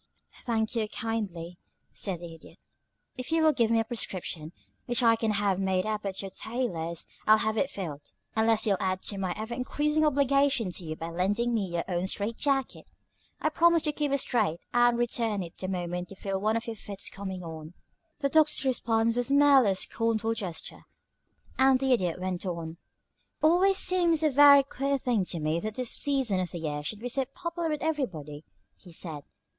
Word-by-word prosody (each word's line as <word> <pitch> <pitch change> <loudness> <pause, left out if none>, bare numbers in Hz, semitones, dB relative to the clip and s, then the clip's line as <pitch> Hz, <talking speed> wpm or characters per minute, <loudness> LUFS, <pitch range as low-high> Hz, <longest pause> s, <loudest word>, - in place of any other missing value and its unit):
"Thank 225 -1 0
you, 220 -2 0
kindly," 200 -7 -4 0.3
said 185 -4 -1
the 170 -1 -8
Idiot. 165 - -15 0.6
"If 255 - -6
you'll 320 -1 +4
give 230 -5 +2
me 230 0 +3
a - - +2
prescription, 185 -8 -4 0.4
which 240 0 +1
I 230 -1 +6
can 225 0 -1
have 200 -2 +1
made 190 -1 0
up 215 -1 -2
at 195 0 -3
your 195 - -6
tailor's, 180 -8 -3 0.2
I'll 215 0 +7
have 220 0 -1
it 270 +5 +1
filled, 155 -7 -6 0.3
unless 220 0 +3
you'll 200 -3 +1
add 185 0 -1
to 200 - -2
my 185 -2 -2
ever 220 +2 -5
increasing 300 +5 0
obligation 275 -6 +2
to 175 - -4
you 155 -1 -5
by 165 +1 -6
lending 205 +8 0
me 210 -4 0
your 170 -1 -2
own 180 0 -1
strait 210 +4 -1
jacket. 275 -2 -1 0.5
I 310 - +2
promise 335 +1 +3
to 305 - +1
keep 295 -1 -2
it 280 - +3
straight 170 - +1
and 240 0 +4
to - - -2
return 230 -4 0
it 170 - -11
the 185 - -3
moment 180 -1 -3
you 195 - -10
feel 195 0 -3
one 215 +2 +1
of 230 - -5
your 230 - -5
fits 200 -1 -5
coming 190 -2 -6
on." 160 0 -9 0.5
The 280 - +1
Doctor's 305 -1 +3
response 230 -3 +1
was 245 +1 0
merely 280 -5 +6
a 190 - +1
scornful 225 +2 -1
gesture, 190 -7 -6 0.7
and 265 -1 +5
the 265 -1 +2
Idiot 180 -7 0
went 185 -1 -3
on: 170 -2 -5
"It's - - -43
always 365 +5 +4
seemed 345 -4 +3
a 305 - +3
very 280 0 +8
queer 275 0 -1
thing 240 -7 0
to 175 - -2
me 155 +2 0
that 215 +3 -5
this 255 -2 -1
season 265 -9 +2
of 180 -1 -2
the 175 - -6
year 150 -3 -3
should 205 +8 -5
be 245 - -3
so 265 +2 0
popular 340 +3 -4
with 300 -1 -3
everybody," 165 - -3 0.3
he 180 - -16
said. 160 -3 -3
220 Hz, 200 wpm, -28 LUFS, 185-265 Hz, 0.7 s, very